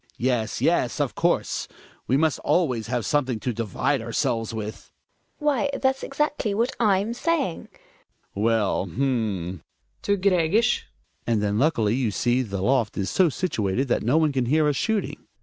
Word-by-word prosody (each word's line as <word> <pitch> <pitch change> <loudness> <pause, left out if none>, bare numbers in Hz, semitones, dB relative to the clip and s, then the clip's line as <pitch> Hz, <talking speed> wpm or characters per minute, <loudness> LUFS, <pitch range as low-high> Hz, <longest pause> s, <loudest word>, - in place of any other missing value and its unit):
Yes, 120 -3 -1
yes, - - +1
of - - 0
course, - - 0 0.4
we 130 - +3
must 160 0 +1
always 125 -11 +1
have 120 -2 -2
something 130 -6 0
to 125 - -2
divide 115 +4 -1
ourselves 115 0 -1
with. 110 -1 -6 0.5
GiNA. 300 - -9
Why 285 -1 +2
that's 265 0 +1
exactly 275 -7 -1
what 235 +4 0
/'m 210 0 +2
saying. 290 - -1 0.7
Hjalmar. 100 - -3
Well, 110 -4 +1
h'm! 105 - -1 0.4
(To 200 0 +1
Gregers.) 190 +3 +2 0.4
And 110 -3 +1
then 105 +1 0
luckily 115 -8 +2
you 125 -2 0
see 120 +5 +1
the 100 -6 -4
loft 120 -2 +1
is 95 -2 -1
so 185 -3 +4
situated 130 - -1
that - - +1
no 125 +8 +2
one 155 -2 +3
can 130 -3 -1
hear 155 +3 +3
us 145 - +1
shooting. 220 - -2
130 Hz, 165 wpm, -24 LUFS, 110-185 Hz, 0.7 s, so